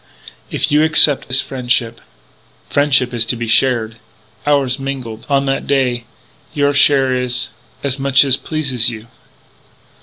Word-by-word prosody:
"If - - -2
you 150 +1 +4
accept 150 -2 +4
his 135 +2 +1
friendship...." 120 -3 -2 0.7
"Friendship 140 -3 +2
is 115 -1 +1
to 125 - +1
be 120 0 -4
shared.... 115 -1 +1 0.5
Ours 140 -3 +1
mingled 130 -5 -6
on 140 -1 +1
that 135 0 -2
day.... 125 -4 0 0.5
Your 145 -1 +1
share 135 -2 +3
is 125 0 -1 0.3
as 140 -1 -1
much 135 +1 +3
as 135 -2 +3
pleases 135 -7 -1
you." 110 -2 -8
130 Hz, 140 wpm, -16 LUFS, 120-140 Hz, 0.7 s, you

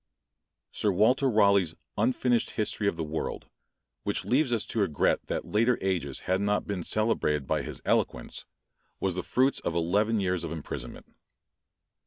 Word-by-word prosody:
Sir 105 - +1
Walter 125 +8 +3
Raleigh's 100 -6 +3 0.2
unfinished 120 +2 +1
History 105 -1 0
of 95 - 0
the 80 - -2
World, 80 +1 -4 0.6
which - - -2
leaves 130 +1 +2
us 115 -3 +1
to 115 - -3
regret 85 -9 +1
that - - -2
later 115 +3 +2
ages 85 -8 -1
had 95 +1 0
not 105 0 +1
been 100 -3 -3
celebrated 110 -11 +1
by - - 0
his - - -7
eloquence, - - -1 0.5
was 95 -2 0
the 90 - -2
fruits 130 +8 +1
of 85 - -3
eleven 105 +7 +2
years 90 -3 0
of 85 - -4
imprisonment. 80 -3 -6
100 Hz, 155 wpm, -28 LUFS, 85-115 Hz, 0.6 s, Walter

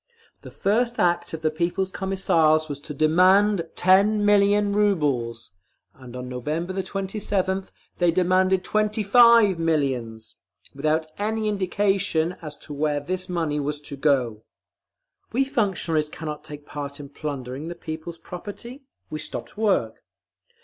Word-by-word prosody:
The - - -10
first 235 +4 0
act 175 -1 +1
of 160 -1 -6
the 155 - +2
People's 175 +4 -1
Commissars 165 -6 +2
was 145 -2 -5
to 150 +1 -8
DEMAND 180 +4 +4
TEN 205 +3 +4
MILLION 205 0 +4
RUBLES, 145 - 0 0.4
and 125 -2 -12
on 125 0 -6
November 150 +9 -3
27th 190 0 -2 0.3
THEY 175 -1 +4
DEMANDED 185 +1 +2
TWENTY 215 +1 0
FIVE 230 -3 +6
MILLIONS, 130 -9 -2 0.4
without 155 +3 0
any 215 +1 -1
indication 195 -4 0
as 150 -2 -8
to 150 - -10
where 145 0 0
this 185 +5 -4
money 165 -4 -1
was 145 +1 -2
to 145 -1 -7
go.… 130 -7 +1 0.9
We 265 +3 +2
functionaries 190 - 0
cannot 150 -1 -6
take 150 -1 -10
part 140 -1 -6
in 140 -1 -9
plundering 140 -1 -6
the 175 - -6
people's 165 0 -7
property. 205 - -9 0.3
We 155 - -4
stopped 155 - -7
work. 200 - 0
170 Hz, 135 wpm, -24 LUFS, 150-200 Hz, 0.9 s, FIVE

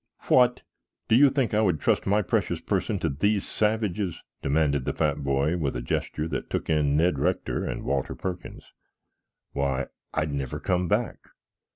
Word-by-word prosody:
"What! 125 -1 +4 0.5
Do 110 - +5
you 140 +3 +7
think 130 -4 0
I 105 - +3
would 90 -8 +2
trust - - +1
my 105 +2 +3
precious 90 - 0
person - - -1
to - - -1
these 100 +9 +1
savages?" 105 -4 -1 0.2
demanded 70 -1 +1
the - - -1
fat 75 -2 0
boy 70 +5 +1
with 70 -6 -1
a - - -2
gesture 75 +5 -2
that 70 - -4
took - - -2
in 75 -2 +2
Ned 80 -3 +2
Rector 70 - 0
and - - -4
Walter 70 -1 -1
Perkins. 90 -2 -6 0.8
"Why, 70 -1 -1 0.2
I'd 75 -2 -1
never 70 -3 -3
come 90 0 0
back!" 105 +4 0
80 Hz, 170 wpm, -26 LUFS, 70-105 Hz, 0.8 s, you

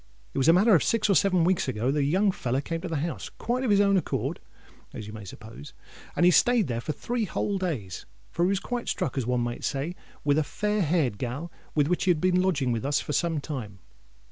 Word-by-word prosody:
It - - -1
was 135 - +2
a 165 - +8
matter 205 +5 +5
of 165 - +5
six 215 -2 +2
or - - +4
seven 185 -3 +3
weeks 180 -2 +2
ago 125 +1 0
that 150 - 0
a - - +2
young 190 +8 +3
feller 130 -6 -2
came 165 +3 -4
to 185 - -4
the 165 - -3
house, 170 - -5
quite 245 +3 -2
on 255 - 0
his 200 -1 +4
own 200 -1 +4
accord, 180 - -2 0.6
as 110 - -6
you 105 - -9
may 110 -1 -8
suppose; 105 -4 -11 0.4
and 175 - +3
he 180 - +7
stayed 240 +4 +4
there 120 -3 -3
three 225 - -2
whole 200 0 -2
days, 125 - -4 0.2
for 170 - 0
he 180 - +3
was 195 -1 +1
quite 245 +3 -4
struck, 170 -9 -2
as 130 -4 -2
one 125 -1 +1
may 120 0 -3
say, 145 +6 -3 0.3
with 145 +1 +3
a - - +2
fair 210 +7 -1
haired 150 - +1
gal 140 +8 -4 0.2
which 155 +5 +1
had 175 -4 +3
been 185 +1 +3
lodging 150 -9 +1
with 115 0 -2
us 145 +2 +1
for 150 - -4
some 165 0 +1
time. 125 -9 -6
165 Hz, 240 wpm, -27 LUFS, 130-190 Hz, 0.6 s, a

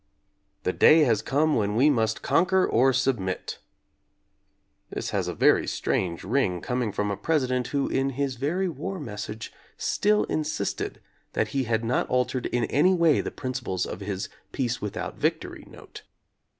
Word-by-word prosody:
"The - - 0
day 160 +1 +6
has 115 -8 +3
come 150 +6 +1
when 105 -1 0
we 130 +6 +5
must 110 -4 0
conquer 185 +2 +3
or 130 +3 +3
submit." 120 -8 -1 1.3
This - - -4
has - - -1
a - - -3
very - - +4
strange 85 -3 -1
ring 95 -4 0
coming 125 +2 -2
from 105 +1 -1
a - - -1
Presi 150 +1 0
dent 125 -1 0
who 140 -1 -1
in 135 +1 0
his 140 -3 -1
very 170 +9 0
war 180 +4 -5
message 110 -4 -6 0.2
still 210 0 +2
insisted 155 -9 -3 0.3
that 110 - 0
he 135 -2 -1
had 115 0 0
not 120 - 0
altered 125 0 0
in 120 0 -1
any 165 - +3
way 165 -4 +4
the - - -4
principles 125 -9 -3
of 90 - -6
his 100 -1 -4 0.2
"peace 125 -1 -2
without 105 - -4
victory" - - -2
note. - - -12
125 Hz, 165 wpm, -26 LUFS, 110-145 Hz, 1.3 s, day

